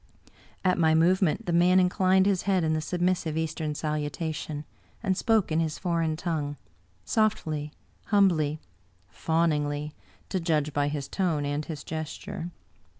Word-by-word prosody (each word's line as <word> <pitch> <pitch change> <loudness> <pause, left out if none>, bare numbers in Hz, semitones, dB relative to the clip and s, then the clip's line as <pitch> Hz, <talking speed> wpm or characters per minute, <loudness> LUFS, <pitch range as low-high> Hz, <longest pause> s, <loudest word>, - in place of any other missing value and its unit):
At 180 -1 +3
my 160 -1 +4
movement 185 +5 +3
the 175 - -1
man 180 +2 +5
inclined 185 +1 +3
his 195 -2 +2
head 185 -3 +3
in 160 0 +1
the 155 - 0
submissive 175 -1 0
Eastern 160 -1 -2
salutation, 150 0 -3 0.4
and 190 -3 +1
spoke 220 -3 +2
in 155 - +2
his 160 -2 -1
foreign 165 -3 0
tongue, 150 -4 -2 0.5
softly, 155 -9 0 0.4
humbly, 170 -8 +3 0.5
fawningly, 150 - 0 0.4
to 190 - 0
judge 155 -3 0
by 145 0 +1
his 145 -2 -3
tone 165 -7 0
and 145 +1 -2
his 150 -3 -6
gesture. 160 +2 -5
160 Hz, 140 wpm, -27 LUFS, 150-180 Hz, 0.5 s, man